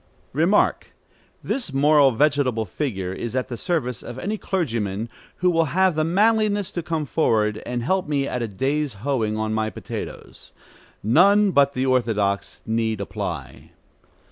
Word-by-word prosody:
Remark. 170 +9 +2 0.5
This 250 - -2
moral 145 +1 +5
vegetable 135 -3 +1
figure 95 -5 -3
is 120 +5 -5
at 130 0 -1
the 120 - -4
service 125 - -2
of 120 +1 -8
any 205 +11 -2
clergyman 115 - -2 0.3
who 180 0 +2
will 165 -1 +2
have 190 -1 +4
the 155 0 0
manliness 205 +3 +2
to 175 - -3
come 160 -2 -2
forward 110 -7 +1
and 120 -1 -2
help 185 +6 0
me 140 -2 0
at 125 - -3
a 115 - -1
day's 135 +5 -1
hoeing 115 -6 0
on 110 0 -1
my 110 0 0
potatoes. 100 - -8 0.5
None 195 - +5
but 140 -3 +4
the 130 0 -1
orthodox 105 -6 0
need 110 -1 -1
apply. 100 - -6
135 Hz, 150 wpm, -23 LUFS, 110-165 Hz, 0.5 s, moral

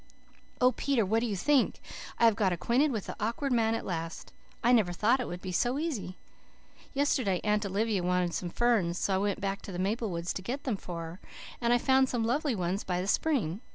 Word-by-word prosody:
"Oh, 250 0 +5
Peter, 260 -5 0
what 220 +4 +2
do 240 - -1
you 210 - -2
think? 275 +7 +2 0.4
I 235 - +4
have 225 -2 +5
got 195 -2 +2
acquainted 240 - +2
with 220 -6 -3
the - - -6
Awkward 235 +5 -1
Man 225 -1 +2
at - - -4
last. 165 -2 -5 0.3
I 240 - +4
never 215 -8 +3
thought 225 +8 +2
it 250 - -3
would 175 0 -7
be 185 - -4
so 245 +8 +1
easy. 270 - -3 0.8
Yesterday 255 -9 +1
Aunt 210 -1 +1
Olivia 205 0 0
wanted 180 -1 0
some 175 - -3
ferns, 200 -5 +1
so 195 - 0
I - - +3
went 200 0 -1
back 195 0 -2
to - - -8
the 175 - -5
maple 210 +4 -1
woods 170 0 -3
to - - -5
get 255 +9 -4
them 250 -6 -1
for 175 -3 -6
her, 165 +3 -8 0.4
and 235 0 +2
I 245 - +5
found 265 +1 +3
some 235 -3 0
lovely 275 +2 0
ones 185 +1 -2
by 180 -1 -1
the 180 - -2
spring. 215 - 0
210 Hz, 225 wpm, -30 LUFS, 185-245 Hz, 0.8 s, Oh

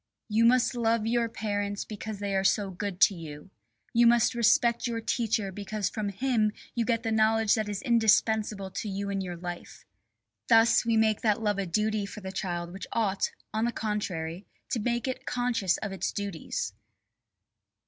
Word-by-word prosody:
"You 220 +2 +3
must 250 +2 +4
love 230 -2 +1
your 230 0 +1
parents 205 -2 -3
because 215 0 -6
they 200 0 -2
are 190 - +1
so 195 0 +2
good 185 0 -5
to 185 - +7
you. 160 0 -9 0.4
You 235 0 +5
must 235 0 +4
respect 235 +1 +3
your 230 -1 -2
teacher 220 -3 -1
because 205 +1 -3
from 215 -2 -2
him 215 0 +1 0.2
you 235 -1 0
get 230 -1 0
the 225 - -1
knowledge 220 0 +3
that 215 -3 0
is 205 +3 -4
indispensable 220 -4 +2
to 210 - -4
you 200 +1 -3
in 195 -1 -1
your 180 -2 -5
life." 175 0 -8 0.6
Thus 225 0 +5
we 230 -1 +3
make 220 -1 +2
that 220 0 +1
love 205 -2 +1
a 195 - -2
duty 210 +3 0
for 210 - -9
the 190 -1 -6
child 175 -3 -4
which 190 0 -7
ought, 200 -4 0 0.2
on 220 +1 +1
the 240 - 0
contrary, 190 -6 -3 0.2
to 240 - 0
make 240 +3 -1
it 260 +1 -4
conscious 245 -7 0
of 215 - -5
its 195 - -2
duties. 200 -5 -4
215 Hz, 180 wpm, -28 LUFS, 195-230 Hz, 0.6 s, to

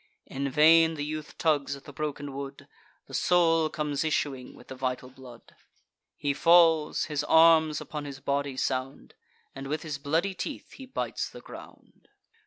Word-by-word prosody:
In 140 +1 -4
vain 160 +3 +5
the 145 -1 -4
youth 155 0 -6
tugs 145 -3 +1
at 140 - -13
the 145 - -12
broken 145 -1 -5
wood; 140 0 -8 0.4
The - - -15
soul 165 -3 +3
comes 150 -2 -2
issuing 140 -4 -2
with - - -17
the - - -6
vital 130 0 -4
blood: 125 -3 -15 0.6
He 145 -1 -1
falls; 165 0 +4
his 150 -2 -2
arms 160 -2 +5
upon 150 -1 -6
his 140 -1 -8
body 140 -1 -2
sound; 130 +1 -3 0.4
And 135 0 -7
with 150 +2 -3
his 150 -3 -5
bloody 165 +7 0
teeth 275 - -6
he 265 - -11
bites 260 - -3
the - - -11
ground. - - -14
150 Hz, 165 wpm, -27 LUFS, 140-160 Hz, 0.6 s, vain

